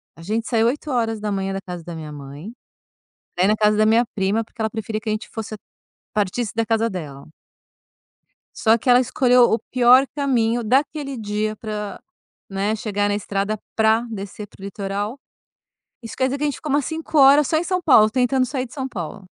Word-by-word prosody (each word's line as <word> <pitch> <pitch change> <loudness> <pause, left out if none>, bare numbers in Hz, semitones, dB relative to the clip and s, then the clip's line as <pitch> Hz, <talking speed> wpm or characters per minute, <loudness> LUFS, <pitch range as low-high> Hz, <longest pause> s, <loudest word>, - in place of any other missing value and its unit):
A - - -14
gente 220 +6 -2
saiu 230 -2 +2
8h 225 -8 -1
da 195 - -3
casa 180 -3 -7
da 170 - -8
minha 155 -2 -7
mãe 145 +6 -9 0.8
pra 180 - +2
ir - - +4
na 215 - +4
casa 210 0 +2
da 215 - +4
minha 225 +3 +4
prima, 200 +3 0
porque 225 +1 -11
ela 220 - +1
preferia 220 -1 -4
que 220 0 -5
a - - +1
gente 215 - -5
fosse 220 -1 -6 0.6
partisse 210 +2 -1
da 230 0 +1
casa 225 0 +1
dela. 145 -7 -7 1.3
Só 225 0 +4
que 240 - -3
ela 245 0 +7
escolheu 250 0 +4
o 235 -1 +3
pior 255 +1 +6
caminho 240 -5 +1
daquele 275 +4 0
dia 215 0 -2
pra, 210 -2 -5 0.5
né, 200 +2 -1
chegar 205 -2 -1
na 205 - +1
estrada, 205 +1 -2 0.2
pra 220 +1 +3
descer 205 0 -7
para 190 - -19
o - - -10
litoral. 200 +4 -4 0.8
Isso 230 -2 -8
quer 260 - +1
dizer 265 +2 -1
que 295 - -4
a - - +2
gente 285 - -2
ficou 305 - -5
umas 285 -1 +2
5h 295 -3 +4
só 315 - +1
em 320 - 0
São 365 0 -1
Paulo, 220 -9 +6
tentando 255 +2 +2
sair 255 0 -3
de 245 - -14
São 265 -3 -3
Paulo. 185 -3 -7
220 Hz, 200 wpm, -21 LUFS, 205-255 Hz, 1.3 s, ela